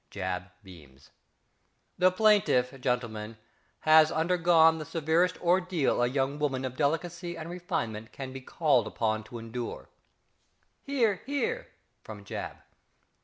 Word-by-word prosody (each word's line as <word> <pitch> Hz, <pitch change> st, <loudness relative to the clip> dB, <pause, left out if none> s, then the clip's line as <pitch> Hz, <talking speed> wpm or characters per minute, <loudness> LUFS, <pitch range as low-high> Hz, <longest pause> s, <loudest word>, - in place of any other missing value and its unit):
(~JAB.~ 90 Hz, -2 st, -4 dB
beams.) 75 Hz, -8 st, -16 dB, 0.9 s
The 185 Hz, 0 st, +6 dB
plaintiff, 185 Hz, -, +3 dB
gentlemen, 115 Hz, -4 st, -2 dB, 0.4 s
has 155 Hz, 0 st, +6 dB
undergone 165 Hz, -1 st, +4 dB
the -, -, -4 dB
severest 165 Hz, +4 st, +1 dB
ordeal 180 Hz, -6 st, +1 dB
a 120 Hz, -, +3 dB
young 135 Hz, +3 st, -1 dB
woman 135 Hz, -3 st, -1 dB
of 130 Hz, -1 st, -5 dB
delicacy 170 Hz, +4 st, -2 dB
and 165 Hz, +1 st, -7 dB
refinement 160 Hz, -, -4 dB
can 130 Hz, -1 st, -7 dB
be 135 Hz, -, -7 dB
called 130 Hz, -4 st, +1 dB
upon 110 Hz, -1 st, -1 dB
to 120 Hz, -, -9 dB
endure 115 Hz, +1 st, -6 dB, 1.0 s
(_"Hear, 235 Hz, -8 st, +1 dB
hear!" 280 Hz, -3 st, -2 dB, 0.3 s
from 105 Hz, -2 st, -10 dB
~JAB. -, -, -6 dB
145 Hz, 120 wpm, -29 LUFS, 115-175 Hz, 1.0 s, The